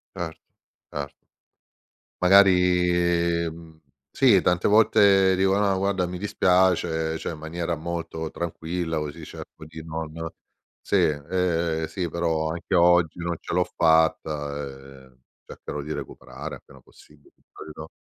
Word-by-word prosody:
Certo, 80 -2 -5 0.5
certo. 70 -1 -7 0.9
Magari 90 -2 +3
mh, 80 -1 -12 0.3
sì, 120 -8 +4
tante 90 0 +1
volte 100 -3 +5
dico: 95 +1 +2
"No, 100 -2 +1
guarda, 95 -1 0
mi 90 +1 -6
dispiace". 90 -4 +1
Cioè - - -4
in 80 - -7
maniera 85 +2 -4
molto 80 0 -5
tranquilla 85 0 -3
così 75 -2 -6
cerco - - -11
di 80 +1 -11
non 80 -1 -5 0.7
"Sì, - - -1
ehm, 80 +1 0
sì, 90 +1 -4
però 80 -1 -1
anche 85 +4 -4
oggi 85 -2 +4
non 85 0 -2
ce - - -5
l'ho 90 - +3
fatta, 80 -3 +1 0.4
ehm, 65 -1 -23 0.3
cercherò 75 - -7
di 75 +2 -5
recuperare 65 +4 -8
appena - - -17
possibile". 75 -1 -21 0.2
Capito? 80 0 -10
85 Hz, 125 wpm, -24 LUFS, 80-90 Hz, 0.9 s, volte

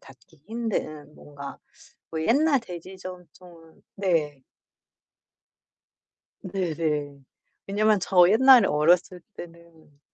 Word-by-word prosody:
닿기 140 +3 -20
힘든 155 -10 -5
뭔가 140 -1 -11 0.5
뭐 160 - -4
옛날 280 - +3
돼지 185 -2 -10
저금통은 180 -2 -13
네. 155 -8 -1 2.0
네네. 160 -6 -3 0.5
왜냐면 210 +1 +2
저 180 -1 +4
옛날에 250 0 +6
어렸을 175 +4 +1
때는 165 -4 -15
175 Hz, 180 characters per minute, -25 LUFS, 155-195 Hz, 2.0 s, 옛날에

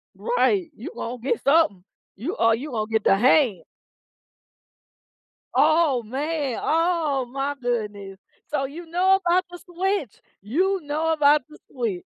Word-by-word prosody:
Right, 405 -7 +1
you 225 - -8
gonna 240 +1 -5
get 280 - -1
something, 275 - +3 0.3
you 280 - -4
or, 230 0 +3
you 280 +4 -7
gonna 220 -1 -3
get 220 -1 +1
the 195 - +5
hand. 240 - +3 1.9
Oh, 310 -5 +3
man! 280 +2 -3
Oh, 320 -5 +1
my 275 +2 -3
goodness! 210 -5 -3 0.3
So 275 -2 -1
you 330 +6 -8
know 365 +3 +3
about 355 +2 +3
the 355 - -8
switch? 365 - -3 0.2
You 370 - 0
know 310 +3 -1
about 295 -1 +4
the 305 - -14
switch. 225 -9 -3
285 Hz, 140 wpm, -24 LUFS, 235-335 Hz, 1.9 s, the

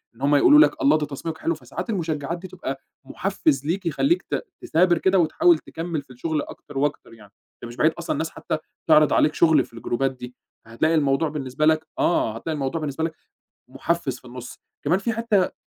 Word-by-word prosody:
إن 120 - -19
هُم 145 +1 +3
يقولوا 295 - +7
لك 310 - +4
الله! 280 - +5
ده 150 - -2
تصميمك 155 +3 -6
حلو. 165 - -1
فساعات 155 - -7
المشجعات 165 -5 -2
دي 185 +2 -9
تبقى 155 -7 -6 0.3
محفز 155 -5 -1
ليك، 180 +5 -2
يخلّيك 275 - +1
ت - - -3 0.2
تثابر 175 +1 +3
كده، 190 +3 +3
وتحاول 320 - +4
تكمّل 165 -2 -5
في 140 - -29
الشغل 150 +4 -2
أكتر 145 0 -10
وأكتر 145 -3 -2
يعني، 105 -3 -16 0.3
ده - - -7
مش 120 - -10
بعيد - - +3
أصلًا - - -4
الناس - - -2
حتى - - -4 0.3
تعرِض 150 0 +5
عليك 150 - +3
شغل 155 -4 +4
في - - -24
الجروبات 120 +3 -1
دي، 125 -1 -10 0.3
فهتلاقي 135 +9 0
الموضوع 145 +1 +2
بالنسبة 145 0 -2
لك 155 0 +2
آه، 115 -10 +1
هتلاقي 160 +8 -4
الموضوع 145 +2 -2
بالنسبة 150 +1 -3
لك 160 -1 -2 0.6
محفز 165 -7 -2
في - - -27
النص. 125 0 -9 0.3
كمان 180 - +2
فيه 225 +4 -2
حتّة 230 -1 0
آآ - - -2
155 Hz, 205 wpm, -23 LUFS, 135-170 Hz, 0.6 s, يقولوا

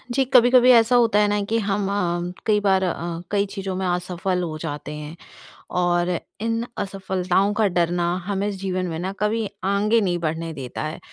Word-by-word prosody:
जी, 270 - +3
कभी-कभी 250 0 +6
ऐसा 230 +1 +5
होता 230 -4 +4
है 210 - +4
ना 205 0 0
कि 225 +3 0
हम 200 -1 -1
अ, 175 -3 -1
कई 215 -2 +3
बार 190 -2 +3
अ, 180 - 0 0.4
कई 200 -1 +2
चीज़ों 195 -1 -5
में 190 0 -2
असफल 180 +1 -1
हो 155 -2 -4
जाते 150 -2 -5
हैं, 150 +1 -8 0.5
और 175 0 +1 0.3
इन 230 +1 -1
असफलताओं 190 0 0
का 210 - +4
डर 175 -2 +1
ना 175 0 0
हमें 200 +1 -1
जीवन 185 -2 -3
में 165 -2 -4
ना 185 +2 -3
कभी 215 +1 0 0.2
आगे 205 +4 +2
नहीं 180 -4 0
बढ़ने 165 0 -3
देता 130 -2 -6
है। 155 +1 -5
190 Hz, 190 wpm, -23 LUFS, 175-210 Hz, 0.5 s, कभी-कभी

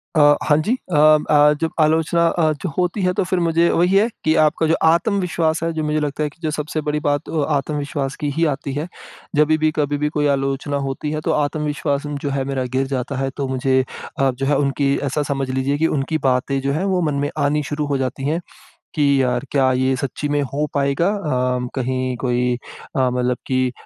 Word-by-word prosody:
अ, 145 -1 +6
हाँ 150 - +3
जी, 230 - +2 0.2
अ - - +3 0.3
अ, 150 0 +6
जब 165 - 0
आलोचना 160 +2 +2
अ, 165 -2 +2
च - - -4
होती 180 +3 0
है 180 -1 +2
तो - - +4
फिर 185 0 -1
मुझे 170 0 +2
वही 180 +3 +2
है 205 +3 +5 0.2
कि 155 - +3
आपका 155 +1 +2
जो 160 - +3 0.2
आत्मविश्वास 170 -3 +1
है 165 - 0
जो 160 -1 -2
मुझे 150 0 0
लगता 150 0 -2
है 150 - -1
कि 150 - -24
जो 155 - 0
सबसे 150 +1 -3
बड़ी 150 0 0
बात 145 +2 0
अ 155 -3 0
आत्मविश्वास 140 -1 -2
की 145 - 0
ही 165 +1 +2
आती 135 0 -6
है। 150 +5 -3 0.5
जभी 150 +1 +4
भी, 155 0 +2
कभी 145 -1 0
भी 150 +1 0
कोई 150 -1 0
आलोचना 135 +1 -1
होती 140 +2 -3
है 155 0 -2
तो - - -1
आत्मविश्वास 145 -1 -1 0.2
जो 145 - -1
है 135 -1 -1
मेरा 135 -1 -2
गिर 135 +1 +1
जाता 135 0 -3
है, 135 0 -1
तो 140 - -2
मुझे 130 0 +1 0.4
अ, 135 0 +3
जो 135 +2 -4
है 145 0 +2
उनकी 140 0 +1
ऐसा 150 +2 -1
समझ 135 -1 -2
लीजिए 130 +2 0
कि 160 +2 +2
उनकी 140 +4 -1
बातें 130 +2 +1
जो 135 +1 -1
है 160 +6 -1
वो 190 -2 +1
मन - - -2
में - - -1
आनी 150 +1 +1
शुरू 150 +2 -3
हो 140 - 0
जाती 130 0 -3
हैं 160 +2 0 0.6
कि, 140 -2 +3
यार 125 +1 0
क्या 135 -2 +3
ये 130 +1 +1
सच्ची 140 +3 -3
में 145 0 +1
हो 150 +2 0
पाएगा? 140 +4 +1
अ, 125 -11 -1
कहीं 130 -1 -1
कोई 125 -1 +1 0.4
अ, - - +2
मतलब 125 0 0
कि 130 -1 0
145 Hz, 220 wpm, -20 LUFS, 135-155 Hz, 0.6 s, अ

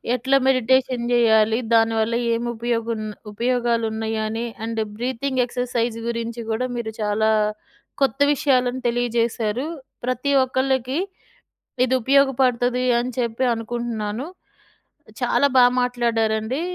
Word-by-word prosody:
ఎట్లా 265 +3 +2
మెడిటేషన్ 255 -1 +2
జెయ్యాలి? 225 -1 +4
దానివల్ల 225 0 +2 0.2
ఏమి 240 +1 -3
ఉపయోగం, 230 -1 -2 0.3
ఉపయోగాలు 235 +1 0
ఉన్నాయని. 220 +1 -2 0.2
అండ్ 225 -1 -2
బ్రీతింగ్ 255 +3 -1
ఎక్సర్సైజ్ 240 -2 -2
గురించి 235 0 -3
గూడా 230 +3 -1
మీరు 220 -2 -4
చాలా 210 +1 +1 0.7
కొత్త 270 0 0
విషయాలను 255 -3 +1
తెలియజేశారు. 235 +1 0 0.4
ప్రతి 255 +3 -1
ఒక్కళ్ళకి 260 +2 0 0.9
ఇది 255 - +1
ఉపయోగపడుతది 255 -2 +2 0.2
అని 250 +1 -3
చెప్పి 235 +1 -1
అనుకుంటున్నాను. 230 0 -4 1.0
చాలా 285 - +3
బా 250 - +8 0.2
మాట్లాడారండి. 235 0 0
235 Hz, 100 wpm, -22 LUFS, 225-255 Hz, 1.0 s, బా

